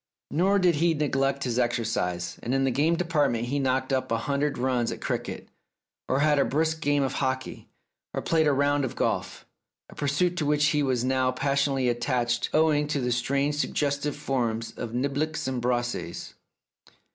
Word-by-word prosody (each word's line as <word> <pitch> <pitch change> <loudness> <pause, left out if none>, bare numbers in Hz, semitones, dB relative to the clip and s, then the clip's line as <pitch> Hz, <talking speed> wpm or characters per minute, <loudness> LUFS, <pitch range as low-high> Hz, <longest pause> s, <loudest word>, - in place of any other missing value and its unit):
Nor 190 +6 +3
did 180 -5 +3
he 165 +1 +2
neglect 140 -2 0
his 125 -1 -1
exercise, 110 -8 -1
and 125 +3 -1
in 135 - +2
the 135 - +2
games 155 +6 +2
department 145 -9 0
he 140 +2 0
knocked 130 0 0
up 130 -1 -1
a 115 - +2
hundred 140 +4 -1
runs 125 -2 0
at - - -6
cricket, - - -4 0.6
or 130 +2 +2
had 150 -1 +3
a - - +5
brisk 160 +2 0
game 145 -2 +2
of 135 - -1
hockey, 130 -1 -3 0.4
or - - -4
played 160 -2 +2
a - - +4
round 145 +1 +2
of 130 - -3
golf, - - -2 0.5
a - - -13
pursuit 150 +5 0
to 155 - 0
which 150 0 +3
he 150 - +1
was 130 -4 0
now 130 0 +1
passionately 135 0 0
attached 120 0 0
owing 155 -1 +3
to 145 -1 -1
the 125 -1 -1
strange 140 +4 0
suggestive 145 -1 -1
forms 115 -6 -2
of 120 - -6
niblicks 140 +4 -1
and 130 -2 -2
brassies. 120 -7 -2
135 Hz, 180 wpm, -26 LUFS, 125-150 Hz, 0.6 s, a